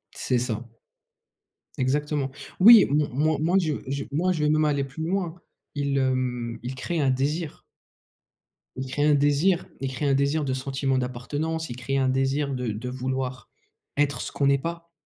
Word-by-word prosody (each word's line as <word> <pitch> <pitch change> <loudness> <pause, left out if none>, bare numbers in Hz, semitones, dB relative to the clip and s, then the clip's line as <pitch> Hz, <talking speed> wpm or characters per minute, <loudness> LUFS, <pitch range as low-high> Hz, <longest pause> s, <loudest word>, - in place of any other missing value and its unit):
C'est 125 - 0
ça. 120 -1 -2 1.1
Exactement. 140 +1 0 0.3
Oui 220 +1 +10
m 150 +2 +2
m 145 - -1
moi 155 +2 +2
moi 175 +4 +3
je 155 -4 0
je, 140 +1 -2
moi 175 +6 +1
je 155 -4 -1
vais 150 - +3
même 155 0 +3
aller 140 -2 +1
plus 135 +4 -6
loin, 180 -3 -1 0.4
ils, 140 -1 -1
hem, 125 -3 -1
ils 125 +2 -5
créent 165 +5 -3
un 135 - +2
désir. 145 +5 -2 1.1
Ils 130 +1 -4
créent 145 +3 0
un 150 - +5
désir, 145 +6 +2 0.2
ils 135 -1 -2
créent 145 +2 -2
un 135 - +3
désir 140 +2 +1
de 130 - -1
sentiment 135 0 -1
d'appartenance. 145 +6 -3
Ils 120 - -5
créent 135 +2 -2
un 130 -1 +2
désir 135 +2 0
de 125 -3 -2
de 115 +4 -5
vouloir 130 0 -4 0.5
être 140 -3 +1
ce - - -5
qu'on 140 -1 +1
est 140 - +4
pas. 170 +3 -6
140 Hz, 185 wpm, -25 LUFS, 130-155 Hz, 1.1 s, Oui